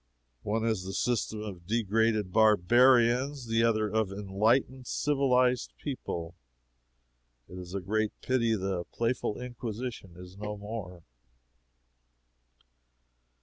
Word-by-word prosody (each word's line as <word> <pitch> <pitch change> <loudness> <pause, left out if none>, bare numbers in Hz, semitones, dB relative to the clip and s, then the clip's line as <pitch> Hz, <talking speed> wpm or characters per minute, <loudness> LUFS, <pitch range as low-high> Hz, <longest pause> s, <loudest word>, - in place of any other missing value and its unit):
One 110 +2 -1
is 110 -5 0
the 95 +1 -6
system 110 -3 -1
of 90 -5 -8
degraded 110 -2 +1
barbarians, 120 +5 +4
the 115 0 +1
other 110 -2 +2
of 110 -1 0
enlightened, 110 +6 0
civilized 130 -3 +1
people. 85 - -5 1.1
It 90 - -9
is 90 +1 -8
a 100 - -2
great 110 +3 0
pity 115 -3 +2
the 95 -3 -2
playful 115 -2 -1
Inquisition 120 -5 -6
is 90 +1 -12
no 105 0 -5
more. 100 -4 -7
110 Hz, 105 wpm, -29 LUFS, 100-120 Hz, 1.1 s, barbarians